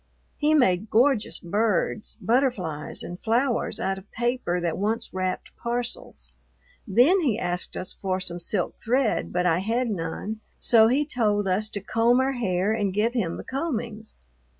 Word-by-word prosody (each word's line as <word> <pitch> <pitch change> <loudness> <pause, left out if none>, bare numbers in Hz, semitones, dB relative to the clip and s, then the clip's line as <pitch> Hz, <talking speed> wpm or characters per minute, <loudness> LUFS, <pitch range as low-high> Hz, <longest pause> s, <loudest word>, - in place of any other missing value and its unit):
He 305 +1 +3
made 205 -7 +3
gorgeous 245 0 +2
birds, 210 +3 -1
butterflies, 220 - 0
and 175 +1 -7
flowers 240 +2 +1
out 195 0 -1
of 190 - -19
paper 240 -7 -1
that 170 -2 -1
once 225 +3 -1
wrapped 185 0 -3
parcels. 240 0 -3 0.6
Then 250 - +5
he 260 - +1
asked 180 -4 -3
us 185 - -4
for 185 -1 -2
some 175 -2 -2
silk 180 +2 -2
thread, 250 0 +1
but 180 0 0
I 170 -1 +3
had 230 +4 0
none, 200 +4 -4 0.2
so 225 -2 +6
he 275 +5 +2
told 210 -8 0
us 200 +4 +1
to 205 - -4
comb 230 +5 +2
our 265 +1 +2
hair 200 -4 0
and 205 -3 0
give 215 +5 +1
him 190 -9 -1
the - - -7
combings. 235 -6 -4
220 Hz, 160 wpm, -25 LUFS, 185-245 Hz, 0.6 s, so